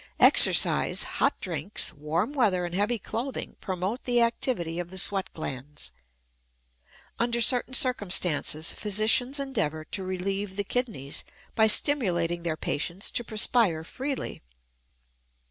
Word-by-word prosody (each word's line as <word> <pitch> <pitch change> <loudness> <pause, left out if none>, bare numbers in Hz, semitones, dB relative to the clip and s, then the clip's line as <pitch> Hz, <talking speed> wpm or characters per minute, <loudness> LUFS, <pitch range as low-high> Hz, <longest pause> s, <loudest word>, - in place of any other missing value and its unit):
Exercise, - - +5
hot - - -1
drinks, 180 +1 -2
warm 160 - -2
weather, 200 -10 +1
and 175 - -6
heavy 205 +5 0
clothing 245 +5 -5
promote 190 +6 -4
the 245 -1 +2
activity 230 - -1
of 175 -1 -5
the 190 - -9
sweat 195 +1 0
glands. 140 - -7 1.3
Under 235 0 0
certain 250 +2 +4
circumstances 180 - +1
physicians 220 +6 +1
endeavor 160 - -2
to 190 - -4
relieve 190 +1 -4
the 205 - -2
kidneys 210 - -3 0.3
by 220 -1 +4
stimulating 180 - +2
their 165 -2 -3
patients 170 +8 -3
to 240 - -2
perspire 215 -6 +2
freely. 270 - -5
195 Hz, 120 wpm, -26 LUFS, 170-240 Hz, 1.3 s, Exercise